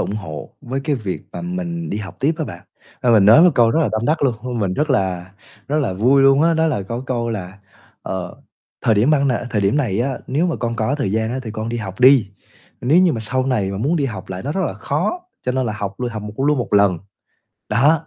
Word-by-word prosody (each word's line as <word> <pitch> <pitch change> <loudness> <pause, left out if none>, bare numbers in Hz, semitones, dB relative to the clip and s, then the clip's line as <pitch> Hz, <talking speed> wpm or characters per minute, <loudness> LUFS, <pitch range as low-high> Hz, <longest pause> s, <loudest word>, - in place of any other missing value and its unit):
ủng 105 - -2
hộ 80 -8 -7
với 130 +3 -4
cái 150 -1 +1
việc 100 -6 -4
mà - - -6
mình 175 -1 -4
đi 105 - -2
học 100 -2 -8
tiếp 150 +5 +2
á 160 - -1
bạn. 90 -5 -8 0.4
Ba 125 - +3
mình 110 -4 +6
nói 110 +10 +8
một 180 - +7
câu 115 -2 +4
rất 160 - +2
là 155 - +2
tâm 110 +1 -1
đắc 155 +1 +1
luôn, 130 -4 +2
nên 125 -2 -3
mình 95 -3 0
rất 150 +6 0
là 95 -6 -1 0.4
rất 150 - 0
là 130 -10 0
vui 125 +8 +3
luôn 135 +2 +5
á, 165 0 +3
đó 160 0 +2
là 130 -11 -1
có 115 +6 -5
câu 120 -2 -1
là 95 -2 -6 0.4
"Ờ, 95 -2 -5 0.5
thời 110 - +3
điểm 115 +9 +3
ban 140 -2 +3
này 120 -1 -1
thời 105 -4 0
điểm 100 +8 +2
này 115 -8 0
á, 130 0 -1
nếu 150 +7 +1
mà 170 - -1
con 115 -1 -3
có 110 +6 0
thời 140 -9 -1
gian 110 +1 0
á 130 - -2
thì 110 - -6
con 110 +1 -4
đi 120 - -2
học 105 -1 -6
đi, 130 -5 +6 0.5
nếu 145 +8 +3
như 180 -2 +4
mà 115 - -3
sau 130 +4 -1
này 110 -8 0
mà 100 - -4
muốn 145 +11 +1
đi 145 - 0
học 100 -7 -7
lại 95 0 -5
nó 145 - -3
rất 195 - -1
là 115 - -4
khó, 155 - -2 0.2
cho 125 - -1
nên 130 -1 0
là 110 - -2
học 100 -2 -4
l - - -6
vừa 125 - 0
hầm 105 -2 -6
củ 135 +6 -1
luôn 150 -1 +3
một 120 - -4
lần." 100 -4 +4 0.7
Đó, 145 +8 +3
120 Hz, 275 wpm, -20 LUFS, 105-145 Hz, 0.7 s, nói